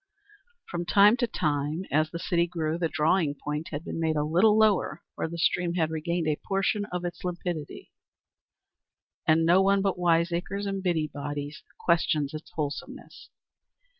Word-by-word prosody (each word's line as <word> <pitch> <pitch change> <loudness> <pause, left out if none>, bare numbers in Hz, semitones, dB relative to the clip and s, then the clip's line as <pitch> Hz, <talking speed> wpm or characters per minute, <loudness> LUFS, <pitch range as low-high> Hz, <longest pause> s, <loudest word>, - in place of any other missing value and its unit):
From 175 0 -3
time 200 +5 +6
to 240 -1 +1
time, 150 -1 -1
as 155 +2 +2
the 170 - -5
city 170 0 +1
grew, 165 -1 -2
the 165 -2 0
drawing 155 0 +1
point 150 +2 -4
had 150 +1 -5
been - - -4
made 160 -1 +1
a 150 - +1
little 185 +8 +4
lower 200 -6 +2
where - - -3
the 170 +1 -7
stream 170 +1 +1
had 160 -3 +1
regained 165 +1 -2
a 150 -1 +1
portion 195 +1 0
of 180 -3 -4
its 175 - -6
limpidity, 175 -4 -5 1.4
and 160 +1 +4
no 175 +3 +5
one 195 0 +3
but 195 -2 0
wiseacres 175 +3 +1
and 195 -1 -2
busybodies 145 -4 -3 0.2
questioned 155 -4 +1
its 155 +1 -8
wholesomeness. 145 -2 -6
170 Hz, 160 wpm, -27 LUFS, 155-180 Hz, 1.4 s, time